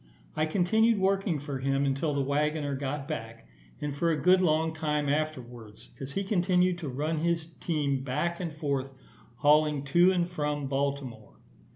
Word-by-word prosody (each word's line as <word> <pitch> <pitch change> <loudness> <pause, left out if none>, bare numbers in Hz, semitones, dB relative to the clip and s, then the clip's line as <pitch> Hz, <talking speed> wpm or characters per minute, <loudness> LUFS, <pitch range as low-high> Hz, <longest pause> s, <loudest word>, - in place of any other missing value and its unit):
I 155 0 +1
continued 220 +6 +3
working 195 -3 +1
for 140 -1 -5
him 135 +1 +1
until 140 +2 0
the 140 - +1
waggoner 145 +1 0
got 140 +1 -4
back, 115 -7 -6 0.3
and 145 -1 -3
for 170 +4 +1
a 155 -2 +1
good 185 +5 +5
long 160 -2 +2
time 150 -2 -1
afterwards, 125 -7 -4
as 135 0 -6
he 195 - -1
continued 180 -2 +2
to 155 -5 -5
run 150 +5 -2
his 165 0 0
team 140 -5 -1
back 150 +6 -2
and 175 -3 -3
forward, 140 -3 -2 0.5
hauling 150 +2 +3
to 175 +6 +4
and 175 -2 +1
from 150 -4 -2
Baltimore. 135 -5 -3
150 Hz, 165 wpm, -28 LUFS, 140-170 Hz, 0.5 s, good